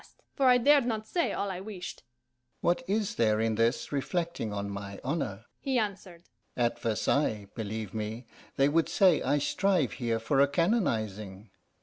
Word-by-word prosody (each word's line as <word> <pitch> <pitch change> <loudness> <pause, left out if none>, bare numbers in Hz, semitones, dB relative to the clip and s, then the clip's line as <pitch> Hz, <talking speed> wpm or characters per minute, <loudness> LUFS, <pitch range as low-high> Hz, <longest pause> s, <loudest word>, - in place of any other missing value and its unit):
I - - -20
asked; - - -22 0.2
for 275 - 0
I 250 -1 +7
dared 280 +1 +5
not 220 -2 -2
say 340 +9 0
all 200 - -2
I 180 - -5
wished. 190 -3 -7 0.6
"What 175 +7 +2
is 210 0 -1
there 110 -2 +3
in 110 0 +1
this 115 +2 0
reflecting 165 - -2
on 100 0 -3
my 100 0 -6
honour?" 125 -8 -2
he 265 -2 0
answered. 190 -5 -3 0.3
"At 120 -1 +1
Versailles, 110 -1 0
believe 110 -2 -5
me, 110 +2 -4 0.3
they 135 - +4
would 160 +3 +2
say 185 -5 +4
I 145 - +2
strive 175 0 +1
here 115 -3 -1
for 115 +5 0
a 140 - +6
canonizing. 110 - -1
140 Hz, 175 wpm, -29 LUFS, -, 0.6 s, I